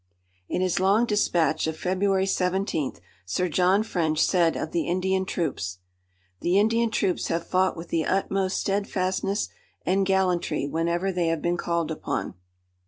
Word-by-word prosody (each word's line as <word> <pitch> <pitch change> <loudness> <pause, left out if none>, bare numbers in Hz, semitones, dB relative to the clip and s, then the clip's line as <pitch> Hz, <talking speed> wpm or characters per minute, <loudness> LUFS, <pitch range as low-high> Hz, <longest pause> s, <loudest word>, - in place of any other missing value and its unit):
In - - -1
his 185 -2 +1
long 200 +5 +4
dispatch 170 -8 +1
of 160 0 -3
February 190 +2 +1
seventeenth 180 - -1 0.2
Sir 135 - -1
John 185 +5 +3
French 160 -7 -1
said 170 -3 +2
of 155 - -4
the 170 - -1
Indian 190 +2 0
troops: 135 - -3 0.6
"The 180 +3 +2
Indian 230 +3 +3
troops 195 -4 0
have 170 0 -1
fought 185 0 +1
with 165 +1 -8
the 165 -1 0
utmost 195 0 0
steadfastness 195 0 -1 0.4
and 195 +2 +2
gallantry 185 -6 +1
whenever 170 +5 0
they 175 -2 0
have 165 -2 -1
been 175 0 +1
called 170 -2 -1
upon." 155 - -3
180 Hz, 150 wpm, -26 LUFS, 165-195 Hz, 0.6 s, long